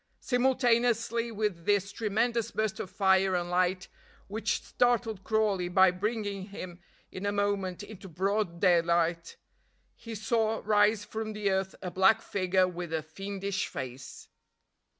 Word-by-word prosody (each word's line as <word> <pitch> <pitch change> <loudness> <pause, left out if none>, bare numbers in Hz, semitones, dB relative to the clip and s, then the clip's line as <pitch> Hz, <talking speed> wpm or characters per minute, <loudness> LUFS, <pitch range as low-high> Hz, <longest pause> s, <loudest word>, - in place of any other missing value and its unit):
Simultaneously 240 -2 +1
with 205 -6 -2
this 200 -1 +2
tremendous 230 +2 0
burst 215 -3 -2
of 185 - -5
fire 190 -1 +3
and 175 0 -2
light, 180 +1 +1 0.4
which 210 +1 -2
startled 235 -5 0
Crawley 210 -5 +1
by 185 0 +5
bringing 200 0 -3
him 185 -3 -8 0.3
in 185 - -7
a 205 - 0
moment 200 -2 -1
into 205 -2 -10
broad 190 +1 -1
daylight, 170 -2 +2 0.6
he 230 -1 -8
saw 225 +1 0
rise 210 0 +3
from 220 0 -5
the 210 -2 0
earth 190 0 -1
a 180 - -4
black 190 +4 +4
figure 185 -1 +1
with 175 -2 -6
a 160 -1 -1
fiendish 195 +4 -4
face. 130 0 -8
200 Hz, 135 wpm, -29 LUFS, 185-220 Hz, 0.6 s, by